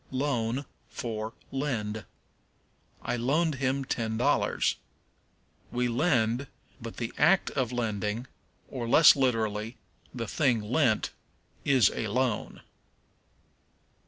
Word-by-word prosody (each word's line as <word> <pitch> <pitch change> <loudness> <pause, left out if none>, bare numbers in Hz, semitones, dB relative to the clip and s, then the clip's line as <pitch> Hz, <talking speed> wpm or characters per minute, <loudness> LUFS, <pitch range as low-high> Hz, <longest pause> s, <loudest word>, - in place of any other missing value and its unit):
Loan 130 -1 -1 0.2
for 110 -3 -4 0.2
Lend. 110 - -2 1.0
"I 120 - -1
loaned 150 +7 +1
him 135 +1 0
ten 110 -3 -2
dollars." 120 - +1 0.9
We 125 0 0
lend, 120 -1 +1 0.3
but 115 0 -8
the 115 -1 -4
act 175 +5 +4
of 130 -4 -1
lending, 110 -1 -2 0.4
or, 120 -3 -5
less 155 +6 +8
literally, 115 -3 0 0.3
the 115 -3 -5
thing 125 -6 +2
lent, 120 0 +1 0.5
is 130 -8 +5
a 110 - -2
loan. 125 +1 -1
120 Hz, 100 wpm, -28 LUFS, 110-135 Hz, 1.0 s, less